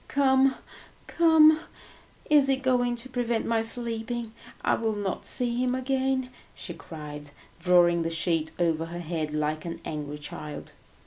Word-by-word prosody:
Come, 265 -1 +3 0.5
come, 315 -2 +5 0.7
is 295 -2 +5
he 270 - +3
going 250 -2 +1
to 240 +2 -5
prevent 240 -3 -1
my 230 -1 +1
sleeping? 230 0 -2 0.3
I - - +2
will 220 -2 -1
not 200 -2 -3
see 245 -1 +1
him 250 0 0
again!" 260 0 -1 0.2
she - - -8
cried, 150 -2 -9 0.3
drawing 175 -1 +4
the 165 - -1
sheet 165 -1 0
over 165 -2 0
her 170 +1 -7
head 160 -2 -3
like 155 0 -2
an 170 -1 -6
angry 150 -1 -5
child. 150 0 -8
225 Hz, 145 wpm, -27 LUFS, 165-260 Hz, 0.7 s, come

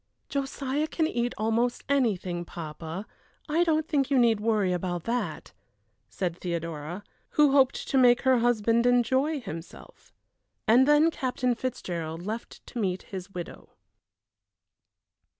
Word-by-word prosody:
"Josiah 280 +1 -2
can 320 0 0
eat 240 -5 -1
almost 230 +3 0
anything, 195 -11 0
papa. 165 +3 -7 0.4
I 325 +3 +2
don't 315 -2 +1
think 280 -4 +1
you 275 - +3
need 230 -3 +4
worry 210 -4 +1
about 175 -1 -2
that," 240 +1 -3 0.6
said 180 -3 -2
Theodora, 170 +1 -4 0.3
who 295 -2 +6
hoped 270 -1 +3
to 270 - +2
make 245 -1 +5
her 260 -2 +4
husband 235 0 +2
enjoy 260 +5 +2
himself. 195 - -10 0.6
And 245 +5 +6
then 295 +2 +5
Captain 250 -3 -1
Fitzgerald 175 -10 -4
left 220 +3 -6
to 245 - -7
meet 185 -3 -1
his 190 -1 -7
widow. 175 -3 -8
235 Hz, 130 wpm, -27 LUFS, 180-270 Hz, 0.6 s, who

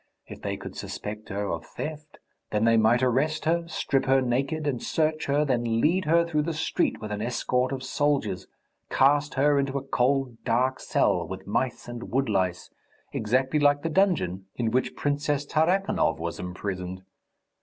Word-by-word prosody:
If - - -10
they - - -3
could - - -9
suspect 105 +1 -6
her 100 +1 -2
of 85 0 -3
theft, 150 - -7 0.3
then 105 +1 +1
they 115 0 +5
might 115 +3 +4
arrest 140 +6 +1
her, 170 +1 +1
strip 135 -4 0
her 135 0 +4
naked, 135 +5 -1
and 135 -5 -1
search 155 0 0
her, 145 +2 +2
then 120 -4 +1
lead 170 +7 +2
her 170 +2 +4
through 155 -3 0
the 160 +1 -2
street 160 - 0
with 105 -1 -6
an 105 0 -3
escort 125 +2 0
of 135 -1 -4
soldiers, 135 -8 0 0.4
cast 145 +2 +3
her 140 +1 +4
into 140 0 -1
a 135 - -4
cold, 135 -2 0
dark 130 +3 +1
cell 85 -2 +1
with 95 +2 -7
mice 120 +4 -2
and 120 -1 -7
woodlice, 100 -9 0 0.4
exactly 130 +6 +1
like 145 0 +3
the 165 - 0
dungeon 125 - +1
in 115 -2 -1
which 130 +2 0
Princess 145 0 0
Tarakanov 170 - +1
was 85 +1 -4
imprisoned. 90 0 -5
130 Hz, 170 wpm, -26 LUFS, 110-150 Hz, 0.4 s, they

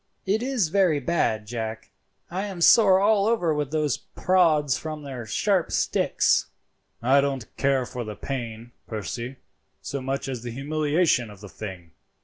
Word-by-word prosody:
"It 205 +3 +1
is 250 -9 0
very 180 -5 +3
bad, 125 -8 0
Jack. 110 -2 -5 0.4
I 190 +3 -2
am 190 -3 -7
sore 190 +1 +6
all 205 0 +3
over 180 -9 +2
with 150 -2 -2
those 150 -3 0
prods 160 -8 +2
from 155 -1 -6
their 130 -5 -7
sharp 190 - +1
sticks." - - +2 0.6
"I 135 +3 +5
don't 135 -4 -3
care 135 -2 +1
for 125 0 -5
the 105 -2 -6
pain, 120 -3 -6 0.2
Percy, 120 +4 -5 0.4
so 140 - -5
much 135 +1 -3
as 130 -3 -4
the 120 - -6
humiliation 145 0 +1
of 105 -2 -13
the 100 0 -10
thing. 90 -3 -8
140 Hz, 155 wpm, -25 LUFS, 120-175 Hz, 0.6 s, sore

